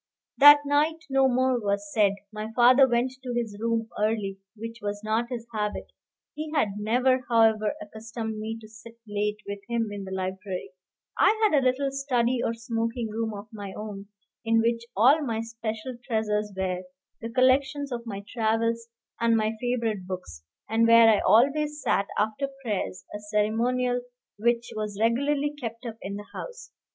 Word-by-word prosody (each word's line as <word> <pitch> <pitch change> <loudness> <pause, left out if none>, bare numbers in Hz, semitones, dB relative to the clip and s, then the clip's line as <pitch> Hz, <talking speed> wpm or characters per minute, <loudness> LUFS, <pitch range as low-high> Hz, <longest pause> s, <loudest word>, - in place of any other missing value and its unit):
That 290 +1 +10
night 305 +3 +1
no 270 0 +4
more 255 0 +2
was 200 -1 -2
said. 205 -3 +4 0.2
My 215 +1 -5
father 255 +2 +7
went 240 +1 +1
to 250 -2 -4
his 230 -4 -2
room 230 0 0
early, 210 -2 -1 0.2
which 230 +1 -7
was 205 0 -4
not 220 +2 0
his 240 -3 -5
habit. 210 -1 -3 0.4
He 305 0 -5
had 220 -8 +3
never, 255 +4 +2
however, 220 -2 +3
accustomed 220 +1 -6
me 220 +1 -4
to 215 - -12
sit 225 +2 -14
late 210 0 -1
with 200 0 -4
him 230 -2 0
in 205 -1 -5
the 190 - -8
library. 190 0 -4 0.5
I 435 - +4
had 420 -7 +4
a 280 - +4
little 265 +2 +1
study 255 -3 0
or - - +1
smoking 230 0 -2
room 220 0 -3
of 205 +1 -8
my 200 -3 -7
own, 205 -2 -7 0.4
in 225 -1 +3
which 230 0 0
all 270 +9 +6
my 230 -6 -2
special 225 +1 -5
treasures 210 -3 -1
were, 185 -1 -1 0.4
the 230 - -4
collections 265 +3 +2
of 235 -1 -5
my 200 -2 -5
travels 230 0 0 0.3
and 230 -1 +3
my 215 0 +1
favorite 230 -6 -1
books, 180 - -7 0.3
and 225 +1 +3
where 230 0 +8
I 215 -2 +5
always 295 +6 +3
sat 200 -8 +1
after 220 +6 0 0.2
prayers, 205 -5 -3
a - - -4
ceremonial 230 +4 0 0.4
which 235 +1 +1
was 210 -2 -4
regularly 280 +6 +1
kept 230 0 -6
up 225 -2 -6
in 200 +1 -5
the 205 0 -7
house. - - -8
230 Hz, 170 wpm, -26 LUFS, 210-250 Hz, 0.5 s, That